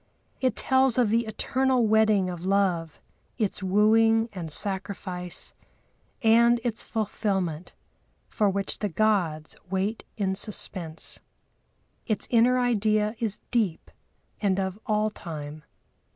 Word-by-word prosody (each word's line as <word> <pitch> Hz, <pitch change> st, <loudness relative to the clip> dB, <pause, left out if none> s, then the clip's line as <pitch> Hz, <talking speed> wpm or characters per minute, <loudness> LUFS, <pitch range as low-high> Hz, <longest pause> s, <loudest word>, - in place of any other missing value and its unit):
It 255 Hz, -4 st, +1 dB
tells 260 Hz, -2 st, +2 dB
of 235 Hz, -4 st, +3 dB
the 230 Hz, 0 st, +1 dB
eternal 255 Hz, +2 st, +1 dB
wedding 215 Hz, -3 st, +3 dB
of 175 Hz, -1 st, -7 dB
love, 185 Hz, -5 st, 0 dB, 0.4 s
its 210 Hz, -4 st, -1 dB
wooing 225 Hz, +4 st, +3 dB
and 170 Hz, -5 st, -5 dB
sacrifice, 185 Hz, -1 st, -1 dB, 0.7 s
and 235 Hz, +1 st, +5 dB
its 235 Hz, -3 st, -2 dB
fulfilment, 190 Hz, -6 st, -2 dB, 0.5 s
for 210 Hz, -2 st, +1 dB
which 195 Hz, 0 st, -2 dB
the 205 Hz, -, -1 dB
gods 175 Hz, -6 st, 0 dB
wait 195 Hz, +4 st, -2 dB
in 195 Hz, -3 st, 0 dB
suspense. 185 Hz, -5 st, -4 dB, 0.9 s
Its 215 Hz, -4 st, -1 dB
inner 245 Hz, +2 st, +4 dB
idea 215 Hz, -3 st, +1 dB
is 220 Hz, -3 st, -3 dB
deep 215 Hz, -9 st, -1 dB, 0.5 s
and 195 Hz, -2 st, +1 dB
of 190 Hz, +1 st, -3 dB
all 215 Hz, -1 st, +1 dB
time. 155 Hz, -5 st, -8 dB
210 Hz, 115 wpm, -26 LUFS, 185-225 Hz, 0.9 s, and